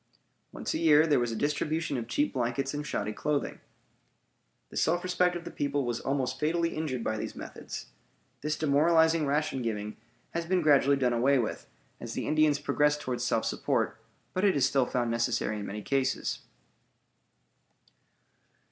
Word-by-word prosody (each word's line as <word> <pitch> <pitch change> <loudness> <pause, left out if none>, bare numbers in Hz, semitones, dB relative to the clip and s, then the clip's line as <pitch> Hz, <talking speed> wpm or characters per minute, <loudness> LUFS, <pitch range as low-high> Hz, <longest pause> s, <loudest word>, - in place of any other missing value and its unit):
Once - - -4
a - - -1
year 155 -1 +6
there 150 -5 +3
was 120 -1 0
a - - -3
distribution 150 +3 -1
of 120 -3 -3
cheap 145 +5 0
blankets 130 +2 -1
and 150 0 -4
shoddy 105 -3 -2
clothing. 145 +5 -2 1.1
The - - -11
self 175 +2 +2
respect 180 0 +1
of 170 -1 -6
the - - -6
people 145 -1 -1
was 120 -1 -2
almost 130 -1 -2
fatally 165 +2 0
injured 135 -7 -2
by 110 - -1
these - - -5
methods. - - -7 0.6
This 150 +1 -1
demoralizing 160 +1 +3
ration 145 -2 0
giving 105 -2 -3 0.3
has 170 0 -3
been 185 -1 +2
gradually 140 -2 +5
done 125 -3 +1
away 130 +4 +3
with 120 -4 -2 0.3
as - - -6
the - - -3
Indians 155 -1 +3
progressed 150 +1 +1
toward 125 -3 -3
self 115 -2 0
support, - - -1 0.3
but 185 - -1
is 165 -10 +4
still 135 -2 +2
found 120 -2 -1
necessary 115 -2 0
in 100 - -5
many 105 +1 -6
cases. 135 -1 0
140 Hz, 165 wpm, -29 LUFS, 120-155 Hz, 1.1 s, year